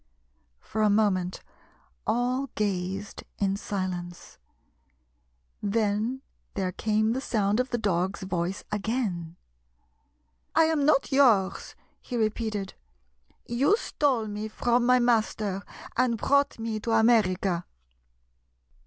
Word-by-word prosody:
For 220 - -4
a 215 - +4
moment 195 -4 +1 0.6
all 250 +4 0
gazed 195 -1 -2
in 195 -1 +1
silence. 185 -3 -5 1.2
Then 215 +4 0 0.3
there 190 -2 -1
came 215 +3 +1
the 260 - -2
sound 210 -4 +1
of 255 +1 0
the 240 - -1
dog's 190 -2 -1
voice 185 0 -2
again. 205 -6 -2 1.2
"I 325 - +6
am 315 -3 +2
not 290 -3 +3
yours," 235 -9 +3 0.3
he 245 - -5
repeated. 215 -2 -1 0.4
" 60 0 -39 0.2
You 390 +10 +5
stole 270 - 0
me 210 +1 -4
from 240 +2 +1
my 250 0 +6
master 220 -5 +1 0.3
and 235 -2 +2
brought 280 +5 +2
me 225 -1 -3
to 225 +2 -2
America." 200 -6 +3
215 Hz, 110 wpm, -27 LUFS, 195-240 Hz, 1.2 s, I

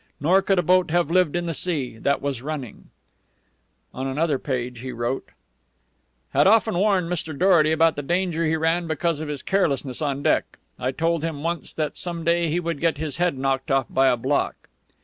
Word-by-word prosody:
Nor 180 +7 +4
could 195 0 +1
a 180 - +2
boat 180 +1 +3
have 170 -1 +1
lived 180 -4 +3
in 175 0 -1
the 165 - -2
sea 140 -7 -2
that 140 +2 0
was 140 -4 -2
running_." 140 -5 -6 1.1
On 130 +1 -4
another 145 +1 0
page, 125 -3 -3
he 130 +2 -6
wrote: 120 +3 -3 1.0
"_Had 145 +5 +4
often 220 0 +4
warned 190 -2 +2
Mr. 165 -4 -3
Dorety 170 -4 +4
about 160 0 +3
the 145 - -3
danger 170 +2 0
he 160 - +1
ran 165 +2 0
because 160 0 -1
of 155 - -5
his 145 -2 -4
carelessness 145 -8 0
on 140 -2 -2
deck. - - +1 0.2
I 125 - -1
told 165 +3 0
him, 155 -3 -4
once, 170 0 -3
that 155 -2 -2
some 170 -2 -4
day 170 0 +2
he 165 +3 0
would 170 -4 -3
get 165 -3 +1
his 155 0 -4
head 175 -5 +1
knocked 135 +2 -1
off 135 -2 +2
by 135 0 +3
a 125 -2 +3
block. 135 +4 0
160 Hz, 200 wpm, -23 LUFS, 135-175 Hz, 1.1 s, Nor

